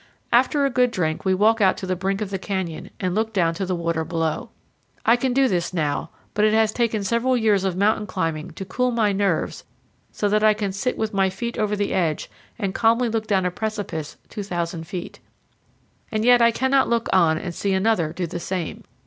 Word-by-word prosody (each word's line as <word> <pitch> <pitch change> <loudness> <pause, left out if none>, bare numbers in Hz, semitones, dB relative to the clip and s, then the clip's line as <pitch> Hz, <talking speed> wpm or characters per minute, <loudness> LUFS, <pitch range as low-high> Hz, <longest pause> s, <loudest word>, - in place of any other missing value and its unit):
After 265 +4 +4
a 275 - +1
good 250 0 +3
drink 160 -7 -2
we 190 0 +3
walk 220 +3 +3
out 190 -2 +4
to - - -5
the 185 0 -1
brink 195 +3 -2
of 200 -2 -3
the 195 - -2
canyon 190 -4 -4
and 185 -2 -1
look 220 +2 -1
down 170 -5 +2
to 185 +3 -3
the 185 - 0
water 170 -1 -1
below. 165 -1 -2 0.6
I 230 - +6
can 255 +1 0
do 265 +1 +3
this 180 -4 -1
now, 150 -4 -1 0.2
but 210 - +1
it 215 0 +4
has 220 -1 +3
taken 225 -3 0
several 235 +5 +1
years 210 -4 +2
of 190 -2 -1
mountain 210 +1 +2
climbing 165 -2 -2
to 195 - -6
cool 250 +7 0
my 225 -4 +2
nerves 195 -4 -1 0.5
so 205 - -1
that 210 +1 +2
I 215 -1 +5
can 205 -2 -2
sit 200 +6 -2
with 220 0 -2
my 195 -1 +2
feet 235 +5 -4
over 210 -1 0
the 205 0 -1
edge 165 -5 -1 0.3
and 200 -4 -2
calmly 230 +3 +3
look 220 -1 -2
down 190 -3 +2
a 180 - +1
precipice 190 -7 -4
2,000 175 -5 -4
feet. 180 0 -6 0.9
And 215 0 0
yet 245 -1 +6
I 235 - +6
cannot 265 +3 +2
look 235 -1 +1
on 165 -4 +4
and 175 +1 -5
see 195 +3 -1
another 190 -5 +1
do 175 +2 -3
the 170 +1 -5
same. 180 -2 -4
200 Hz, 215 wpm, -23 LUFS, 180-225 Hz, 0.9 s, I